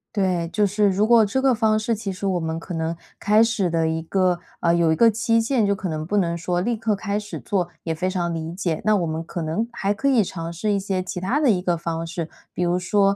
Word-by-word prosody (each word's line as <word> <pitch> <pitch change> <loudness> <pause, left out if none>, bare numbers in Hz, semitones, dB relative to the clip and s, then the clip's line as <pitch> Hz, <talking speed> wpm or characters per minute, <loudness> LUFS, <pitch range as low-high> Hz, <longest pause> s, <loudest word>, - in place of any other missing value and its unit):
对， 180 -4 0
就 210 +2 +2
是， 205 +1 +2
如 195 +2 +2
果 230 0 +6
这 210 +5 0
个 265 -1 +3
方 220 -2 +2
式 225 +2 0
其 210 -2 -4
实 190 +2 -6
我 185 -2 +1
们 160 0 -3
可 175 +2 -8
能 165 0 -2 0.2
开 210 +2 +4
始 225 -5 +1
的， 165 -1 +1
一 160 0 -1
个 180 +1 +1 0.2
呃， 170 -1 +2
有 170 -2 +3
一 - - +3
个 230 +6 +5
期 230 +1 +2
限， 230 -2 +1
就 200 - +2
可 190 -1 -4
能 155 -2 -3
不 200 +6 -1
能 170 -4 +1
说 175 +1 -1
立 235 +5 0
刻 220 -1 0
开 200 +1 -2
始 210 0 -7
做， 185 -4 -1
也 165 - -1
非 180 +4 -1
常 175 -2 -1
理 165 0 -4
解， 175 -3 -2
那 215 0 +4
我 180 -4 +1
们 160 0 -3
可 170 0 -5
能 165 +9 -1
还 200 -3 -1
可 225 +7 -2
以 255 -6 +4
尝 165 -2 -5
试 205 +5 -1
一 200 - +1
些 190 -1 -2
其 180 0 -5
他 215 +11 0
的 285 -6 +4
一 180 -3 +1
个 175 -2 0
方 165 0 -3
式。 170 -1 -4 0.3
比 180 - -1
如 175 +1 +1
说， 195 +2 +2
190 Hz, 290 characters per minute, -23 LUFS, 170-215 Hz, 0.3 s, 果